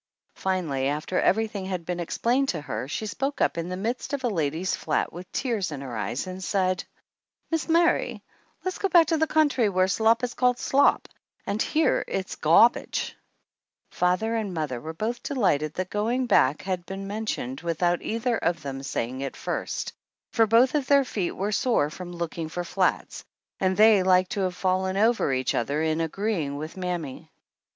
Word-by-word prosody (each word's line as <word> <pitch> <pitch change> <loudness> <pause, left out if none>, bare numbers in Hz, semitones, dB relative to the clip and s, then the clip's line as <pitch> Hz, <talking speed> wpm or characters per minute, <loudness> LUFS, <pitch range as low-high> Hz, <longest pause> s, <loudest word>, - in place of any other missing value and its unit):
Finally, 165 -8 -1
after 150 +5 -1
everything 210 -2 +1
had 180 -3 -4
been 180 0 -3
ex 170 - -4
plained 265 +4 +2
to 170 - -1
her, 145 -3 -4
she 190 +9 -3
spoke 270 +8 -3
up - - +2
in 170 +1 -3
the 185 - -3
midst 235 +8 -3
of 280 -2 -2
a - - +2
lady's 165 -1 -1
flat 155 - -1
with 175 +2 -9
tears 220 - -1
in 140 -2 -5
her 130 -4 -6
eyes 110 - -2
and 185 0 -7
said: 185 -1 0 0.7
"Mis' 325 0 -1
Mary, 340 +1 +2 0.4
le's 370 - -2
go 390 - 0
back 340 -2 +6
to 320 +1 +1
the 320 - +2
country 290 -9 +3
whar 185 -1 +2
slop 225 +4 +3
is 245 - -1
called 250 -1 +2
slop; 275 +3 +3 0.4
up 210 +2 -1
here 315 +1 +2
it's 190 -1 -3
'gawbageT 170 +10 +3 0.4
' - - -66 0.3
Father 185 +6 +1
and 210 -5 -2
mother 145 -7 -3
were 160 - -5
both 225 +7 -3
delighted 160 - 0
that 185 0 -3
going 235 +5 0
back 145 - +3
had 185 -2 -2
been 195 +1 -5
mentioned 200 - -4
without 175 +1 0
either 230 +1 -1
one - - +3
of 170 -3 -5
them 135 -1 -5
saying 130 -1 -3
it 135 -1 -4
first, - - -3 0.4
for 225 -2 +3
both 235 +4 +5
of 290 -4 0
their 280 -1 +5
feet 195 -7 -2
were 200 +2 -2
sore 210 - +1
from 175 +1 -8
looking 170 -2 -4
for 175 +2 -3
flats; 180 +1 -1 0.4
and 185 -1 +1
they 215 -2 +7
like 185 0 +3
to 220 - -3
have 185 -2 -1
fallen 185 0 0
over 220 - +3
each 130 0 0
other 140 +6 0
in 160 0 0
agreeing 165 -4 -2
with 155 +2 -6
mammy. 175 -7 -4
185 Hz, 190 wpm, -26 LUFS, 165-225 Hz, 0.7 s, they